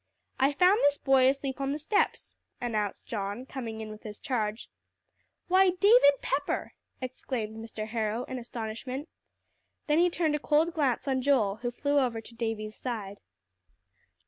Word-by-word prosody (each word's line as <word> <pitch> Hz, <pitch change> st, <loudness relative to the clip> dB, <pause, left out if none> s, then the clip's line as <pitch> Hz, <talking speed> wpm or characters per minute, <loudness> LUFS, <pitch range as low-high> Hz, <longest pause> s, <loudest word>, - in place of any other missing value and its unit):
"I 270 Hz, +2 st, +4 dB
found 365 Hz, +8 st, +5 dB
this 285 Hz, 0 st, +4 dB
boy 265 Hz, -1 st, +4 dB
asleep 275 Hz, 0 st, -2 dB
on 275 Hz, 0 st, 0 dB
the -, -, -2 dB
steps," 360 Hz, +8 st, 0 dB, 0.3 s
announced 215 Hz, -4 st, -2 dB
John, 205 Hz, +2 st, -4 dB
coming 230 Hz, -5 st, -6 dB
in 215 Hz, -, -6 dB
with 215 Hz, -, -10 dB
his 210 Hz, -1 st, -8 dB
charge. 220 Hz, -6 st, -2 dB, 0.8 s
"Why, 375 Hz, +1 st, +5 dB
David 410 Hz, -8 st, +7 dB
Pepper!" 285 Hz, +1 st, -1 dB, 0.3 s
exclaimed 250 Hz, -3 st, -4 dB
Mr. 225 Hz, -1 st, -6 dB
Harrow 220 Hz, +1 st, -1 dB
in 255 Hz, 0 st, -5 dB
astonishment. 245 Hz, +5 st, -5 dB, 0.8 s
Then 300 Hz, +1 st, +3 dB
he 355 Hz, +1 st, +5 dB
turned 325 Hz, -3 st, 0 dB
a -, -, -1 dB
cold 310 Hz, +3 st, +2 dB
glance 285 Hz, -5 st, 0 dB
on 260 Hz, -1 st, +1 dB
Joel, 245 Hz, -7 st, +2 dB
who 240 Hz, +1 st, -2 dB
flew 285 Hz, +4 st, +1 dB
over 245 Hz, -4 st, 0 dB
to 225 Hz, -, -13 dB
Davie's 225 Hz, -2 st, -3 dB
side. 210 Hz, -5 st, -5 dB
255 Hz, 155 wpm, -29 LUFS, 220-285 Hz, 0.8 s, David